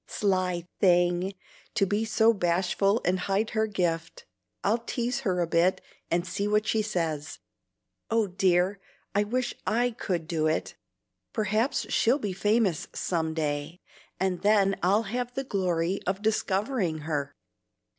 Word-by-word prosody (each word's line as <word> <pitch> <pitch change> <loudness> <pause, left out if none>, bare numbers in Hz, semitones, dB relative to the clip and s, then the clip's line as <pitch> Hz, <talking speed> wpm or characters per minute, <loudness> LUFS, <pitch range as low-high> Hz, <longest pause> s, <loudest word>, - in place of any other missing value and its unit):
Sly 185 -3 0
thing! 175 +1 +3 0.4
to 200 - +3
be 205 +3 0
so 220 +1 +4
bashful 190 +3 +1
and 185 +2 +2
hide 200 +4 0
her 220 -1 +1
gift. 170 -5 -2 0.4
I'll 220 +4 +2
tease 240 +2 -2
her 185 -9 0
a - - +2
bit 170 +3 +2 0.3
and 170 +1 +1
see 200 +3 -2
what 210 0 +2
she 220 0 +1
says. 160 -7 -2 0.7
Oh 225 -1 +2
dear, 185 0 +2 0.3
I 205 +1 +3
wish 240 +3 -1
I 245 +3 +2
could 180 -8 -3
do 160 -2 0
it! 155 - -1 0.6
Perhaps 215 +3 0
she'll 240 +5 +4
be 205 -9 -3
famous 205 -3 +1
some 160 -3 -1
day, 150 +2 -2 0.4
and 185 -1 0
then 200 -2 +4
I'll 200 +5 +3
have 245 +2 -3
the 270 - -1
glory 185 -5 0
of 190 +2 -1
discovering 205 - 0
her." 145 -3 -3
195 Hz, 145 wpm, -27 LUFS, 175-215 Hz, 0.7 s, so